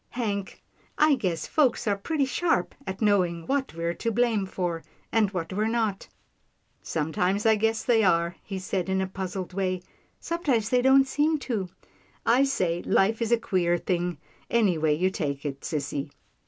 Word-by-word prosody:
Hank, 205 -5 -4 0.3
I 305 0 +5
guess 185 -10 -1
folks 275 -6 +2
are 205 -2 +2
pretty 280 +8 -1
sharp 325 +6 0
at 190 +3 -3
knowing 180 -5 +2
what 270 - -1
we're 170 0 -1
to 230 - -2
blame 225 -3 +1
for, 175 -3 -3 0.3
and 220 -3 +3
what 180 -2 -4
we're 210 +3 0
not." 225 -4 -1 0.4
" - - -44
Sometimes 180 +6 -1
I 220 - +6
guess 225 +1 0
they 230 -3 +3
are," 170 -2 +2
he 195 - -5
said 190 0 -2
in 190 0 +1
a 190 - +1
puzzled 185 -1 -5
way, 185 -1 -1 0.2
" - - -35 0.2
sometimes 280 - 0
they 250 0 +3
don't 265 +1 +5
seem 300 +3 +2
to. 205 -8 -2 0.6
I 250 +4 +5
say 180 -11 0
life 215 +4 +2
is 230 0 0
a 235 - +5
queer 180 -6 +1
thing, 175 -1 -1 0.3
anyway 170 -10 +2
you 185 +3 +1
take 140 -6 -3
it, 140 -1 -4
sissy." 145 -2 -3
195 Hz, 175 wpm, -26 LUFS, 175-230 Hz, 0.6 s, I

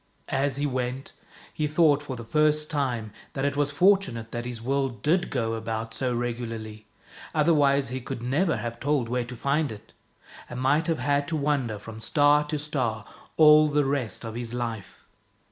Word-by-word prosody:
As 135 0 0
he 145 +1 -1
went, 130 -1 -3 0.4
he 150 - -1
thought 150 -1 +3
for 145 -3 -6
the 115 - -7
first 150 +4 +1
time 120 -8 -2 0.2
that 135 0 -2
it 140 0 0
was 145 0 +1
fortunate 160 - +2
that 120 0 -4
his 120 -2 -5
world 135 +1 -2
did 175 +4 +2
go 115 -3 -1
about 110 0 -4
so 125 +2 -1
regularly, 115 -3 -4 0.5
otherwise 145 -4 +3
he 130 +1 -4
could 120 -1 -6
never 155 +8 +1
have 120 0 -5
told 145 -3 0
where 125 0 -1
to 125 +1 -8
find 140 +3 0
it, 105 -1 -11 0.6
and 125 - -6
might 145 +6 +2
have 165 -2 +1
had 145 -1 0
to 160 - -1
wander 140 -7 0
from 110 +2 -10
star 145 +5 +4
to 150 - -2
star 125 -8 -2 0.3
all 155 -1 +8
the 145 -1 +1
rest 135 -7 -2
of 110 - -5
his 120 0 -4
life. 115 -5 -5
135 Hz, 180 wpm, -26 LUFS, 115-150 Hz, 0.6 s, all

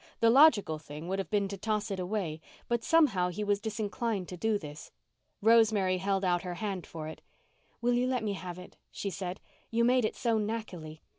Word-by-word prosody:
The 230 0 +5
logical 230 - +5
thing 150 +2 -9
would 190 +1 -1
have 190 -4 -3
been 205 -2 +1
to 200 -1 -6
toss 215 +1 -1
it 195 - -2
away, 180 -4 -2 0.3
but 235 -1 0
somehow 245 - +3
he 195 +4 -4
was 205 -1 +1
disinclined 220 -2 -2
to 180 - -5
do 220 +4 +1
this. 150 -4 -9 0.5
Rosemary 215 -5 +4
held 195 0 0
out 175 -1 +2
her 180 -2 -5
hand 195 -3 -4
for 155 -2 -6
it. 160 - -8 0.6
"Will 245 +1 +2
you 245 +1 +2
let 255 -3 0
me 210 -2 -1
have 180 -2 -6
it?" 180 - -12
she 200 - -4
said. 180 +1 -5 0.3
"You 230 +1 +2
made 250 +1 +4
it 215 - -1
so 230 -2 +1
knackily. 195 -8 -5
200 Hz, 205 wpm, -30 LUFS, 180-225 Hz, 0.6 s, The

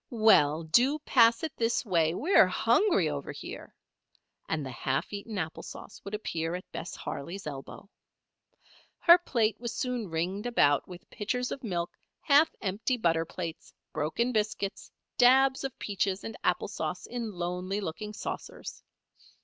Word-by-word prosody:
Well 165 - +4
do 245 - +3
pass 235 -5 +4
it 315 - -3
this 230 +2 +1
way, 165 -4 +2
we're 355 - +5
hungry 365 - +3
over 145 -2 -4
here," - - -9 0.7
and 155 -3 -1
the 130 - -5
half 130 - -2
eaten 205 +1 -5
apple 160 -3 -3
sauce - - -10
would 200 +1 -4
appear 165 -5 -3
at 180 - -8
Bess - - -6
Harley's 175 +8 -6
elbow. 140 +5 -8 1.1
Her 345 +1 +7
plate 230 -10 0
was 235 -1 -4
soon 250 -6 -2
ringed 180 +7 -2
about 145 - +3
with 180 -1 -11
pitchers 250 +4 -2
of 270 - -5
milk, 175 -6 -2 0.3
half 295 +2 +5
empty 210 +6 -1
butter 165 -6 +1
plates, 165 -1 -7 0.2
broken 235 +12 0
biscuits, 210 -3 -2 0.3
dabs 265 +2 +5
of 270 -2 -4
peaches 195 -1 -1
and 225 - -6
apple - - +1
sauce - - -4
in 235 -3 -5
lonely 180 +3 -3
looking 210 +3 -5
saucers. 210 - -7
205 Hz, 150 wpm, -29 LUFS, 165-240 Hz, 1.1 s, Her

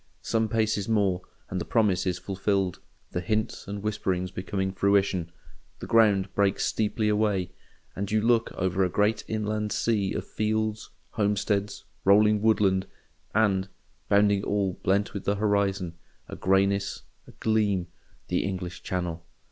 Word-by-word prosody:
Some 110 -1 0
paces 110 -2 0
more, 100 -5 +2 0.3
and 90 -1 -2
the - - -1
promise 100 -5 +1
is 90 -2 0
fulfilled, 95 -1 -1 0.3
the 90 - -2
hints 110 +4 -2
and 100 0 -5
whisperings 95 -4 -1
become 95 0 -2
fruition: 95 -3 +1 0.5
the - - -7
ground 100 -4 +3
breaks 100 0 +2
steeply 110 0 0
away, 105 -4 +1 0.4
and 100 0 -3
you 110 - +3
look 115 +1 +2
over 95 0 0
a 90 - +1
great 105 +4 +1
inland 105 -1 -2
sea 105 -4 0
of - - -3
fields, 110 0 -1 0.2
homesteads, 105 -1 0 0.2
rolling 105 +1 +5
woodland, 100 -4 +3 0.5
and—bounding 100 0 +1
all, 100 -3 -1
blent 100 +2 +1
with 100 - -5
the 100 - +1
horizon, 100 -4 0 0.3
a - - -7
greyness, 100 +1 +1 0.2
a - - -12
gleam—the 100 -6 -1
English 90 -2 -4
Channel. 90 -2 -3
100 Hz, 135 wpm, -27 LUFS, 95-105 Hz, 0.5 s, rolling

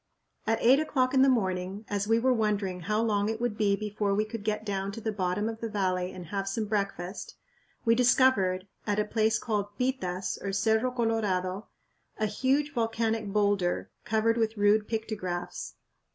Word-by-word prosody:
At 225 0 +3
eight 260 +4 +6
o'clock 260 -4 +1
in 265 - +5
the 270 - +6
morning, 190 -3 -1
as 205 0 -2
we 225 +1 +4
were 255 +2 +3
wondering 205 -5 0
how 210 +5 0
long 210 -2 +1
it 220 0 -3
would 240 -3 -1
be 205 -2 +2
before 210 -1 -1
we 215 +1 +1
could 220 -1 -7
get 215 0 -2
down 195 -1 -2
to 225 - -6
the 220 0 -2
bottom 195 +1 -1
of 225 0 -4
the 230 - -3
valley 185 -3 -1
and 180 -2 -8
have 195 +3 -3
some 215 +3 -1
breakfast, 200 -3 -3 0.5
we 230 - +5
discovered, 230 -7 +3 0.2
at 205 -1 +1
a 210 - +2
place 220 0 +2
called 205 -2 -3
Pitas 195 -8 -2
(or 195 -1 -3
Cerro 220 +4 +2
Colorado), 210 -5 -1 0.5
a 215 - +1
huge 265 +7 0
volcanic 225 -2 -1
boulder 200 -3 +1
covered 225 +1 +1
with 225 -1 0
rude 205 +1 +3
pictographs. 210 -6 -4
210 Hz, 180 wpm, -28 LUFS, 195-225 Hz, 0.5 s, eight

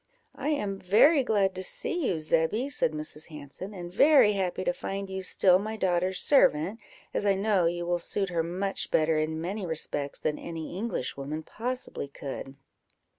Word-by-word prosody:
"I 280 +2 -3
am 205 -10 -1
very 250 - +5
glad 200 -5 +2
to 185 - -5
see 335 - -1
you, 175 - 0
Zebby," 165 - +1
said 255 - +1
Mrs. 155 0 -5
Hanson, 150 +5 -9
"and 175 -1 -7
very 275 -4 +6
happy 190 -3 -2
to - - +1
find 195 - -5
you 190 0 -3
still 185 0 +4
my 215 +2 -4
daughter's 185 -1 0
servant, 200 - +3 0.3
as - - -1
I 200 -1 +3
know 195 -3 +2
you 175 0 -2
will 175 0 0
suit 195 +3 -2
her 170 -2 0
much 185 +4 -2
better 155 0 +2
in 160 +1 -2
many 190 +5 -4
respects 150 -4 -2
than 150 - -2
any 165 0 -6
Englishwoman 155 - -4
possibly 245 - -5
could." 135 -1 -7
185 Hz, 175 wpm, -28 LUFS, 160-210 Hz, 0.3 s, very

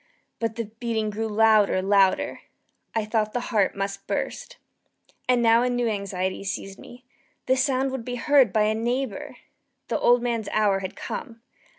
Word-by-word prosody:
But 225 -1 -2
the 230 -1 -3
beating 225 -3 -1
grew 220 +2 -3
louder, 215 -2 +4
louder! 195 -1 +2 0.5
I 220 -1 0
thought 215 -1 -1
the 245 - 0
heart 205 -3 +2
must 195 0 -4
burst. - - -4 0.7
And 245 -1 +3
now 230 0 +5
a 250 - +1
new 245 -1 0
anxiety 195 -3 -2
seized 195 0 -5
me 245 +1 -13 0.4
the 260 - +3
sound 265 0 +1
would 260 -3 -4
be 245 +1 -4
heard 270 -3 +4
by 215 +2 +2
a 215 +1 +2
neighbour! 255 +4 -3 0.5
The - - 0
old 245 0 +4
man's 230 -3 -2
hour 205 -2 +2
had 190 -1 -6
come! 230 -4 -7
225 Hz, 170 wpm, -25 LUFS, 205-245 Hz, 0.7 s, now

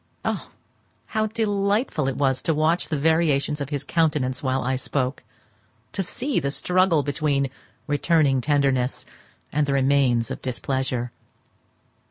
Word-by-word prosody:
Oh, - - -2 0.6
how 215 -1 -1
delightful 205 - 0
it 135 - -2
was 135 -2 +1
to 160 - 0
watch 160 +3 +2
the 155 - -1
variations 150 -1 +2
of 140 - -3
his 145 -2 -3
countenance 150 -6 0
while 130 -1 0
I 130 +1 0
spoke! 130 0 -2 0.7
to 195 - -2
see 245 +6 0
the 140 -3 -1
struggle 170 +3 +2
between 140 -2 0 0.3
returning 145 -3 +2
tenderness 135 -3 +1 0.5
and 150 -1 +1
the 140 - +1
remains 135 -4 +2
of - - -5
displeasure. 130 -1 -2
145 Hz, 135 wpm, -24 LUFS, 130-165 Hz, 0.7 s, watch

